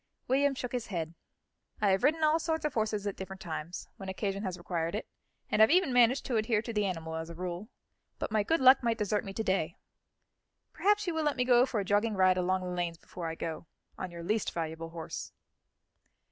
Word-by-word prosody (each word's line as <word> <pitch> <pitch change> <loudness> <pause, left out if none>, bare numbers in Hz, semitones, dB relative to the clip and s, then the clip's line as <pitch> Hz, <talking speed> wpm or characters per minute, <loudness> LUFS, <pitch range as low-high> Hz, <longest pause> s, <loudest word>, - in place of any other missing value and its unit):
William 275 +2 +3
shook 250 -1 -4
his 245 -2 -3
head. 165 -4 -3 0.7
"I 210 - +3
have 190 +2 +2
ridden 315 +3 +3
all 310 +1 +4
sorts 320 -1 -1
of 300 - -1
horses 215 -2 -1
at 200 - -2
different 190 0 -7
times, 165 -1 -5
when 195 -1 -7
occasion 195 +1 -2
has 185 -3 -3
required 170 0 -2
it, 215 - -4 0.4
and - - +2
have 220 - +8
even 350 -5 +4
managed 245 +2 +4
to 245 -4 0
adhere 215 0 +1
to 230 - -5
the 210 -2 +1
animal 165 -3 -4
as 160 0 -5
a 170 - -8
rule; 180 +4 -5 0.5
but - - -4
my 215 -1 +3
good 325 +11 +1
luck 260 0 +7
might 230 -2 +1
desert 210 0 0
me 195 - -6
to 220 - -2
day. 185 -4 0 1.0
Perhaps 415 +1 +2
you 350 - -1
will 320 - 0
let 295 -2 +1
me 250 - +2
go 250 0 +5
for 230 - -1
a 200 - -2
jogging 205 +2 +2
ride 185 -1 +5
along 185 +1 +1
the 180 0 -3
lanes 170 -2 -2
before 170 0 -7
I 165 - -3
go, 165 0 -5 0.3
on 185 - -5
your 170 -1 -8
least 215 +4 0
valuable 165 0 -4
horse." 165 -1 -6
205 Hz, 225 wpm, -31 LUFS, 175-245 Hz, 1.0 s, have